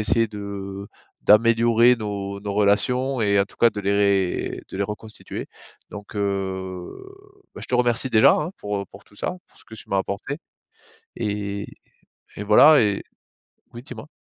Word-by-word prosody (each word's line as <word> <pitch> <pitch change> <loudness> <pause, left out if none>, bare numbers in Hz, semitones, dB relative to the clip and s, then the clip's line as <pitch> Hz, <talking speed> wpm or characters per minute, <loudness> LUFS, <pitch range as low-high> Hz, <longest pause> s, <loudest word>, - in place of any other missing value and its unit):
essayer 115 +2 +2
de 100 -1 -7 0.3
d'améliorer 115 +2 +5
nos 100 -2 -5
nos 100 0 -4
relations 125 +6 +1
et 100 -2 +2
en 100 - +4
tout - - -21
cas 120 - +5
de 105 - -8
les 100 -2 +1
de - - -8
les 100 - 0
reconstituer 105 +2 -7 0.4
donc 105 0 -10
heu, 95 -2 -3 0.6
bah, - - -9
je - - -4
te 125 - -1
remercie 125 +1 +1
déjà, 110 -1 +6
hein, 150 +3 -1
pour 105 -1 -3
pour 100 +1 -15
tout - - -23
ça, 180 - -3
pour - - -25
ce - - -18
que 110 - -12
tu - - -11
m'as 95 - +1
apporté 105 +9 -4 0.8
et 100 -1 -3 0.7
et 105 - -5
voilà 145 +9 +7
et 100 -2 0 0.7
oui, 120 - -9
dis-moi? 125 -2 -10
105 Hz, 165 wpm, -23 LUFS, 100-115 Hz, 0.8 s, voilà